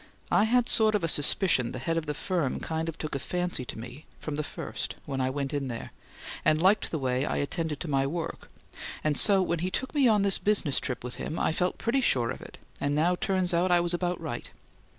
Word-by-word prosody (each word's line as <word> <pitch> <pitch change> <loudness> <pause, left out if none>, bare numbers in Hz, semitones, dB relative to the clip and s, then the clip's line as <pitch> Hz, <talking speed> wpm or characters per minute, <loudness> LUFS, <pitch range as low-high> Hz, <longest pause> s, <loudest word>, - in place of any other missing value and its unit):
I 210 - +4
had 245 +1 +2
sort 215 -1 +5
of 205 - 0
a - - +2
suspicion 145 - +4
the - - -5
head 165 +6 -2
of 165 -2 -2
the 150 - -2
firm 170 -6 -1
kind 160 0 -3
of 165 - -7
took 155 - -5
a 140 - -1
fancy 180 -1 -2
to - - -7
me 125 +6 -9
from 150 - -5
the 150 - -1
first - - -6
when 135 -2 -3
I 130 - +1
went 140 +1 -3
in 140 -2 -2
there, 115 -2 -6 0.5
and 155 - +3
liked 190 +5 +3
the 160 - -2
way 130 -2 0
I - - -1
attended 155 +1 -2
to 175 - -4
my 135 -2 +1
work 165 +3 -5 0.5
and 155 -1 +1
so 195 +2 +6
when 170 -2 -1
he 180 +3 -1
took 260 +7 -3
me 280 -4 +4
on 210 -3 +3
this 200 -1 +2
business 195 -9 +1
trip 125 - -3
with 125 -1 -7
him 160 - -4
I - - +1
felt 180 +3 -1
pretty 250 +4 0
sure 120 - +2
of - - -7
it - - -11 0.2
and 145 +1 0
now 165 +4 +2
it 180 - -6
turns 185 -3 +1
out 175 +2 +2
I 175 -1 +4
was 175 0 -1
about 175 0 -1
right. 150 -8 -6
160 Hz, 250 wpm, -28 LUFS, 140-185 Hz, 0.5 s, so